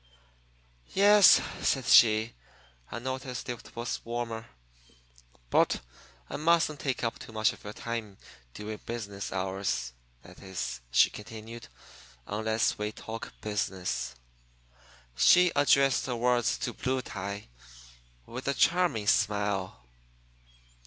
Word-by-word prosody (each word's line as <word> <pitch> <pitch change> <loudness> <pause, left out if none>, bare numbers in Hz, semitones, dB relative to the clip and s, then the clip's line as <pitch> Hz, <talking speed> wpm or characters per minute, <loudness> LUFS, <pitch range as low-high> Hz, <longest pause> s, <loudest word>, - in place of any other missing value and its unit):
"Yes," 205 0 +8 0.2
said 135 -3 +1
she, 110 -1 +6 0.6
"I - - -4
noticed 130 0 -5
it 120 -2 -7
was 120 +1 -4
warmer. 115 -1 -4 1.0
But - - +3 0.5
I - - -5
mustn't 160 -2 +2
take 130 -3 -2
up 115 - -2
too - - -10
much 110 +2 +1
of - - -16
your 105 - -7
time 110 -4 -5 0.4
during 105 +1 -6
business 100 -5 -6
hours. 95 -9 -2 0.3
That 90 +1 -15
is," 85 -10 -5
she - - +5
continued, 115 +2 -9 0.6
"unless 110 +2 0
we 105 0 -2
talk 115 +1 -7
business." 100 -7 -3 1.0
She 180 - +6
addressed 135 -2 +3
her 125 - -2
words 120 0 +1
to 120 - -3
Blue 130 +1 -2
Tie, 100 - -6 0.8
with 125 +3 -7
a 140 - +1
charming 170 -12 +2
smile. 100 - 0
115 Hz, 115 wpm, -29 LUFS, 105-125 Hz, 1.0 s, Yes